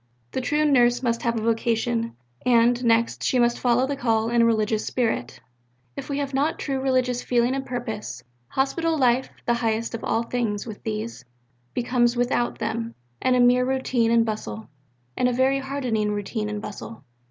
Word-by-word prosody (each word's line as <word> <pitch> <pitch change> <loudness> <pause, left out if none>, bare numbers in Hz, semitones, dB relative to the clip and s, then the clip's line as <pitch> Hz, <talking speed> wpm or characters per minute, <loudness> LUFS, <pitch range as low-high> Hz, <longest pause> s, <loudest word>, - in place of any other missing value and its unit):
The 260 - -2
true 295 +4 +1
Nurse 245 -4 +4
must 235 -1 0
have 235 -1 0
a 220 - -2
vocation; 230 0 0 0.3
and, 240 0 +3
next, 230 0 +2
she 255 - +2
must 240 -1 +2
follow 245 +1 +3
the 280 +1 -2
call 225 -4 +1
in 240 0 +4
a - - +5
religious 220 -1 +1
spirit. 220 - -2 0.6
"If - - -7
we 280 - -1
have 280 -1 -3
not 285 +4 +1
true 270 -2 -2
religious 255 -2 +1
feeling 245 +1 +1
and 270 0 -2
purpose, 240 -4 -5 0.2
Hospital 320 - 0
life, 255 -1 +2 0.2
the 240 - +2
highest 230 -1 -1
of 230 - -5
all 230 - 0
things 230 -4 -2
with 220 -3 -8
these, 220 - -4 0.5
becomes 245 0 +2
without 240 0 0
them 230 +1 -3 0.3
a 255 -1 +3
mere 245 +1 +5
routine 255 -3 +1
and 230 0 +4
bustle, 110 - -5 0.5
and 250 - +2
a - - -1
very 265 +2 +2
hardening 255 -6 -1
routine 210 +1 -3
and 210 0 -4
bustle." 215 +2 -8
240 Hz, 175 wpm, -24 LUFS, 225-255 Hz, 0.6 s, a